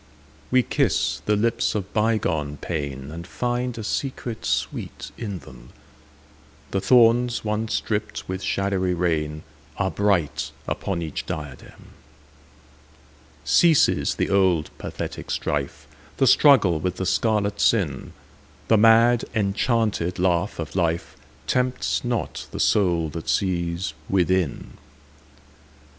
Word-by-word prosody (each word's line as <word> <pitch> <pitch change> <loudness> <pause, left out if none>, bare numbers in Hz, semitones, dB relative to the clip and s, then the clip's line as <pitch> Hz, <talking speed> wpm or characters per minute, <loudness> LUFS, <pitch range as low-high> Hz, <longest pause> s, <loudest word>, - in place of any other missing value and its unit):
We 130 0 +4
kiss - - 0
the 105 - +3
lips 115 +2 0
of 100 -3 -4
bygone 90 -10 0
painAnd 75 +1 -5
find 125 +1 -2
a 110 - -5
secret 120 0 -4
sweet - - -3
in 105 -5 -5
them:The 75 +4 -11
thorns 120 +2 +4
once 110 +1 -1
dripped 105 -1 -4
with 95 0 -4
shadowy 95 -2 0
rainAre 75 0 -3
bright 100 -8 0
upon 90 -4 -2
each 80 -3 -5
diadem. 75 -5 -8 1.6
Ceases 165 -4 +4
the - - -1
old 95 -5 +2
pathetic - - -6
strife, - - -3 0.3
The 135 - +3
struggle 115 - +5
with 90 +3 -2
the 95 - -3
scarlet 105 0 +1
sin:The 100 - -1
mad 115 +2 +5
enchanted 105 -3 0
laugh 90 +1 0
of 80 -2 -5
lifeTempts 95 +8 -2
not 120 -2 -3
the - - -7
soul 85 -6 +2
that 80 +1 -6
sees 85 -2 -1 0.2
within. 95 -4 0
95 Hz, 105 wpm, -23 LUFS, 80-110 Hz, 1.6 s, struggle